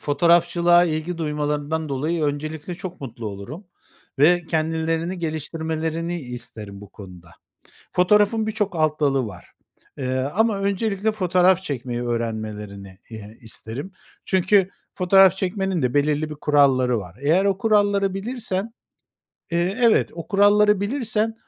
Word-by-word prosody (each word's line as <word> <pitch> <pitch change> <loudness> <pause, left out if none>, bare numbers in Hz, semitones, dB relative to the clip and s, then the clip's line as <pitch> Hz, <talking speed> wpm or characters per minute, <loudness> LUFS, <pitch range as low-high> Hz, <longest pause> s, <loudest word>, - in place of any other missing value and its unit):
fotoğrafçılığa 170 +3 +3
ilgi 165 +1 -3
duymalarından 150 0 -2
dolayı 155 +4 -1
öncelikle 155 +3 -4
çok 180 0 -8
mutlu 120 -4 -7
olurum 105 - -8 0.5
ve 175 +3 +4
kendilerini 165 +2 -1
geliştirmelerini 160 +1 -3
isterim 110 -5 -8
bu 105 - -12
konuda. 90 -4 -13 0.6
Fotoğrafın 210 +4 +3
birçok 210 -4 -2
alt 155 -1 0
dalı 135 -4 +1
var, 105 - -11 0.5
eee, 130 -1 -1 0.2
ama 220 -1 +2
öncelikle 200 +1 0
fotoğraf 185 -1 +2
çekmeyi 125 -5 -4
öğrenmelerini, 105 -4 -5
eee, 110 0 -10
isterim. 120 - -6 0.3
Çünkü 190 +1 +2 0.2
fotoğraf 190 0 +5
çekmenin 190 -3 -1
de 125 +1 0
belirli 150 +1 +1
bir - - -5
kuralları 135 -5 +3
var. 90 -1 -9
Eğer 165 +7 +2
o 195 -1 +1
kuralları 205 -3 +2
bilirsen, 225 0 -3 0.8
eee, 175 +6 0
evet, 230 -2 +4
o 170 - -8
kuralları 205 0 +4
bilirsen, 225 -1 -1
165 Hz, 125 wpm, -22 LUFS, 135-195 Hz, 0.8 s, fotoğraf